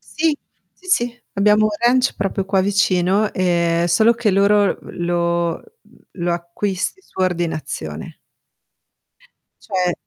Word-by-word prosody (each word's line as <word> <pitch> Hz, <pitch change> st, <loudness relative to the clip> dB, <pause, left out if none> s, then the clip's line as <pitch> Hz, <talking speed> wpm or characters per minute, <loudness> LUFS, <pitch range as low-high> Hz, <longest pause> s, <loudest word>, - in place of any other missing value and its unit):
Sì. 310 Hz, -1 st, +1 dB, 0.4 s
Sì, 370 Hz, -, -20 dB
sì. 245 Hz, -6 st, 0 dB
Abbiamo 210 Hz, +2 st, +4 dB
un -, -, +2 dB
ranch 250 Hz, +2 st, +3 dB
proprio 195 Hz, 0 st, -2 dB
qua 195 Hz, 0 st, +1 dB
vicino, 195 Hz, +1 st, +2 dB
ehm, 170 Hz, -2 st, +1 dB
solo 220 Hz, +7 st, +4 dB
che 235 Hz, -2 st, 0 dB
loro, 200 Hz, 0 st, +3 dB
uhm, -, -, -11 dB
lo 170 Hz, -1 st, 0 dB
uhm, -, -, -14 dB, 0.6 s
lo 175 Hz, -, +1 dB
acquisti 185 Hz, -, -3 dB
su -, -, -14 dB
ordinazione. 155 Hz, -, -3 dB, 1.5 s
Cioè 180 Hz, -2 st, 0 dB
190 Hz, 125 wpm, -20 LUFS, 170-215 Hz, 1.5 s, Abbiamo